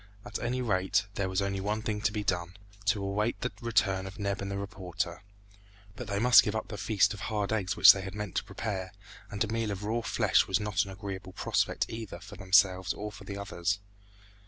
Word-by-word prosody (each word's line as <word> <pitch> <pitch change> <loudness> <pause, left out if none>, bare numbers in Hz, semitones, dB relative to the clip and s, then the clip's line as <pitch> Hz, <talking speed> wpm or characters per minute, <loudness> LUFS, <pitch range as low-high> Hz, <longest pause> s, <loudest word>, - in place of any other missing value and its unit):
At - - -4
any 125 +1 -1
rate, 100 -1 +1
there 100 -2 -1
was 95 +1 0
only 100 0 -1
one 105 +2 -2
thing 105 -2 -2
to 105 - +2
be 105 -1 -3
done 90 -1 -2 0.3
to 105 -2 +2
await 105 +4 -1
the 125 - -1
return 100 -5 +1
of 95 - -9
Neb 100 -1 -2
and 100 - -4
the 100 - -3
reporter; 90 -3 -4 0.7
but 125 - -7
they 100 0 -2
must 120 +3 +8
give 105 - -2
up 110 - -3
the 105 - -5
feast 105 -1 +2
of 105 - -9
hard 105 +2 -1
eggs 100 -2 -1
which - - +10
they 95 - -4
had 95 +1 -7
meant 105 -3 -5
to - - +1
prepare, 95 -3 -4 0.4
and 100 +1 -1
a - - -2
meal 115 0 -1
of 100 0 -4
raw 115 +3 0
flesh - - +2
was 95 -1 +2
not 105 -2 0
an - - -9
agreeable 95 -1 -7
prospect - - 0
either 110 -6 -7
for 95 +3 -11
themselves 95 -1 +3
or 105 +1 -6
for 95 - -12
the 100 - -6
others. 100 -1 -1
100 Hz, 225 wpm, -30 LUFS, 95-105 Hz, 0.7 s, which